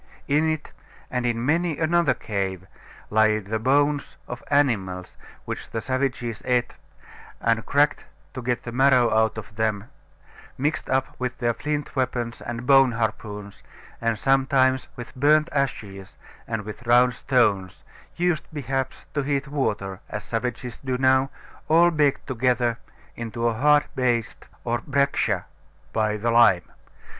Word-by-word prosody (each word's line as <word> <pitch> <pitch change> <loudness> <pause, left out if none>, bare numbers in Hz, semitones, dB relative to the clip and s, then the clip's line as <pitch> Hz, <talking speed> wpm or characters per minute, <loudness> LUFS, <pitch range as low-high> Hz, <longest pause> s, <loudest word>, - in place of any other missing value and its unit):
In 155 +3 +2
it, 155 -1 -3 0.4
and 125 -1 0
in 120 0 -1
many 165 +2 +1
another 170 0 +2
cave, 95 -3 -3 0.5
lie 110 0 +4
the 110 +1 -3
bones 145 +4 +1
of 125 0 -6
animals 100 -11 0 0.3
which - - -6
the 115 - -3
savages 125 -2 -2
ate, 125 -1 +1 0.7
and 115 -1 +1
cracked 145 +1 +2 0.3
to 130 - -5
get 120 0 -1
the 120 - -6
marrow 130 -2 +4
out 110 0 +2
of 110 -1 -9
them, 110 -1 -1 0.7
mixed 145 +4 -1
up 130 0 0
with 125 -1 -3
their 120 -2 +1
flint 150 +3 -3
weapons 120 -3 -2
and 120 +1 -5
bone 135 -2 +6
harpoons, 105 -3 -4 0.4
and 115 -1 0
sometimes 130 +1 +2
with 120 -1 -9
burnt 150 +3 +4
ashes 100 -9 -3 0.3
and 110 -2 -3
with 105 +3 -9
round 125 +1 +5
stones, 105 -8 +1 0.3
used 175 -2 0
perhaps 135 -3 -3
to 145 - 0
heat 140 0 -1
water, 105 -9 -2
as 105 - -5
savages 120 0 -4
do 130 -1 -1
now, 130 +1 +3 0.4
all 170 +2 +5
baked 150 -4 +1
together 120 -1 0 0.4
into 115 0 -4
a 115 - +1
hard 145 +5 +4
paste 120 -3 -1 0.2
or 120 0 -1
breccia 140 0 +1 0.5
by 110 -1 +1
the 115 +3 0
lime. 115 -7 +5
125 Hz, 140 wpm, -24 LUFS, 110-140 Hz, 0.7 s, bone